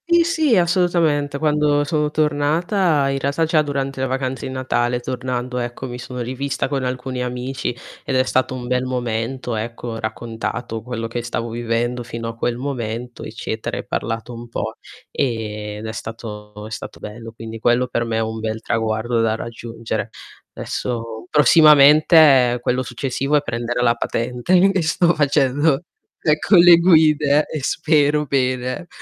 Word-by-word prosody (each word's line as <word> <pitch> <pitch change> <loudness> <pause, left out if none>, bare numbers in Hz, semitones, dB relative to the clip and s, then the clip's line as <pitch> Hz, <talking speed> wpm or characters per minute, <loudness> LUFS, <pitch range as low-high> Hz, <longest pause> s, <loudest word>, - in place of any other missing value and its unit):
Sì, 340 0 +5
sì, 315 -8 +2
assolutamente. 170 -5 +1
Quando 150 -1 +2
sono 150 0 0
tornata, 155 +2 +1
in 135 0 -1
realtà 140 +4 0
già 160 -1 +3
durante 135 -2 -3
le 135 - 0
vacanze 130 0 -3
di - - -6
Natale 125 -2 0
tornando, 125 0 -3
ecco, 120 +2 -5
mi 125 0 -7
sono 125 +1 -7
rivista 130 +3 -2
con 135 -2 -2
alcuni 125 0 -3
amici 125 +1 -3 0.3
ed 135 - -2
è 130 - +4
stato 130 0 0
un 125 -1 -6
bel 125 0 0
momento, 125 0 -3
ecco, 115 +2 -5
ho 115 0 -5
raccontato 115 +1 -4
quello 115 -1 -4
che 120 +1 -4
stavo 120 0 -3
vivendo 120 +1 -2
fino 115 -1 -6
a 115 - -5
quel 120 +1 -2
momento 125 -2 -5
eccetera, 110 0 -5
e - - -6
parlato 115 +2 -4
un 120 0 -9
po', 110 -1 -4 0.4
ehm, 105 -5 -3
ed 105 - -8
è 110 - -4
stato 105 -2 -8
è - - -12
stato - - -7
bello. 115 +2 -8
Quindi 115 0 -8
quello 120 +2 +2
per 120 -1 -1
me 115 -1 -2
è - - +1
un 110 0 -3
bel 110 0 -3
traguardo 115 +1 -1
da 110 -1 +1
raggiungere. 115 0 -5 0.4
Adesso 115 +1 -5
prossimamente 150 -3 +6
quello 125 +1 0
successivo 135 +3 -1
è - - +1
prendere 120 -2 -3
la 115 -1 +4
patente 120 +5 -3
e 185 +2 +6
e 190 - +1
sto 170 +2 +2
facendo, 145 +1 +2 0.4
ecco, 155 +5 +3
le 175 0 +9
guide 155 -4 +4
e 155 - -5
spero 150 +1 +2
bene. 130 +2 -1
125 Hz, 165 wpm, -20 LUFS, 115-145 Hz, 0.4 s, le